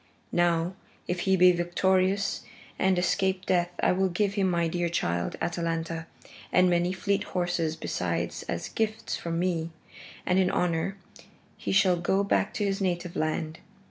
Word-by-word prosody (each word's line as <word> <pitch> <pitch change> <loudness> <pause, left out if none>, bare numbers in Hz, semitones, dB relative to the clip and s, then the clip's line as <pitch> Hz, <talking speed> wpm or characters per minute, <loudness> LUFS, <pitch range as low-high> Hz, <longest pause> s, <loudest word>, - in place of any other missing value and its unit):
Now, 175 0 +2 0.3
if 180 0 -1
he 190 - +5
be 180 0 +7
victorious 185 +3 +1 0.4
and 190 -1 +3
escape 190 +1 +1
death 175 -1 +2
I - - +5
will 190 +1 +2
give 195 +3 0
him 195 -2 +1
my 170 -1 +1
dear 175 +1 -1
child, 85 - -1
Atalanta, 165 -1 -2 0.4
and 180 0 +4
many 175 +1 +2
fleet 200 +1 0
horses 175 -3 -1
besides - - -2
as - - -2
gifts 220 0 -2
from 165 -1 -3
me, 170 -2 0 0.6
and 185 +1 +3
in 185 -1 +3
honor 180 +2 0 0.6
he - - -4
shall 190 -2 +4
go 190 +3 +1
back 200 - +1
to 210 -4 0
his 195 0 -1
native 175 -1 -1
land. 155 0 -2
180 Hz, 155 wpm, -27 LUFS, 170-190 Hz, 0.6 s, be